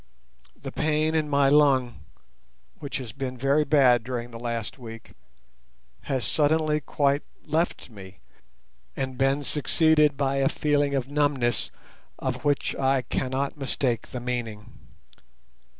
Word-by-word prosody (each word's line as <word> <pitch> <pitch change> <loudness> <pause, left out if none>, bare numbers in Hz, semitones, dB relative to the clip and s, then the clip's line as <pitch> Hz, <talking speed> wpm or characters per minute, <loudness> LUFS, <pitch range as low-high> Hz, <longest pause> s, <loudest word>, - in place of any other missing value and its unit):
The - - -7
pain 155 +1 0
in 155 -2 0
my 140 -1 +3
lung, 135 -5 +3 0.8
which 140 -2 -4
has 125 -5 -6
been 130 -1 -5
very 140 +4 +2
bad 130 -6 +4
during 120 -1 -5
the 115 - -8
last 115 +1 -4
week, 115 -2 -10 0.9
has 130 -3 -1
suddenly 155 0 +2
quite 140 0 +1 0.2
left 160 -4 -1
me, 95 -3 -12 0.8
and 130 -1 -3
been 135 +2 +1
succeeded 150 0 +2
by 135 -1 0
a 135 0 +3
feeling 145 -1 +1
of 135 0 -2
numbness 140 -6 +1 0.5
of 130 -1 -3
which 145 -2 0
I 135 -1 +2
cannot 135 +4 -2
mistake 130 -3 -1
the 125 - -6
meaning. 115 -3 -4
135 Hz, 130 wpm, -26 LUFS, 125-145 Hz, 0.9 s, bad